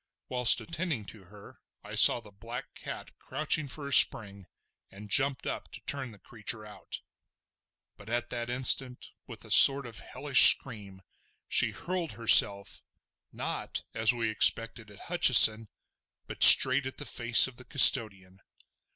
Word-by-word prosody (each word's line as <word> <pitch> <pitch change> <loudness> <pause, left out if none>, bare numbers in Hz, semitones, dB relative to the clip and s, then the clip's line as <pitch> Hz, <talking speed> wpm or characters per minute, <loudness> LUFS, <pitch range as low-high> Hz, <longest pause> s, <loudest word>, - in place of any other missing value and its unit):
Whilst 125 -2 -1
attending 165 - -9
to 105 -4 -22
her 100 +2 -21 0.2
I - - -15
saw - - +2
the 110 -3 -20
black 115 +6 -13
cat - - -13
crouching 155 -1 -6
for 140 +1 -11
a 140 - -7
spring, 100 -7 +1 0.4
and 100 +1 -18
jumped 135 -2 -3
up - - -10
to - - -13
turn 135 -3 -8
the 105 - -19
creature 110 +1 -7
out. 105 -1 -14 1.0
But 105 - -18
at 120 +1 -7
that 120 -1 -8
instant, 125 0 -2 0.2
with - - -14
a - - -14
sort 140 0 +4
of 115 -2 -11
hellish 140 -2 +3
scream, 100 -6 -16 0.4
she - - -3
hurled 180 -2 -9
herself, 100 -3 +1 0.5
not - - -10
as 110 +1 -2
we 115 -2 -7
expected 115 +1 -1
at 100 - -20
Hutcheson, 115 - +3 0.6
but - - -15
straight 130 +1 +6
at 130 - -13
the 145 - -8
face 120 +1 +2
of 130 -2 -17
the 125 - -16
custodian. 100 -9 +1
120 Hz, 150 wpm, -24 LUFS, 105-135 Hz, 1.0 s, straight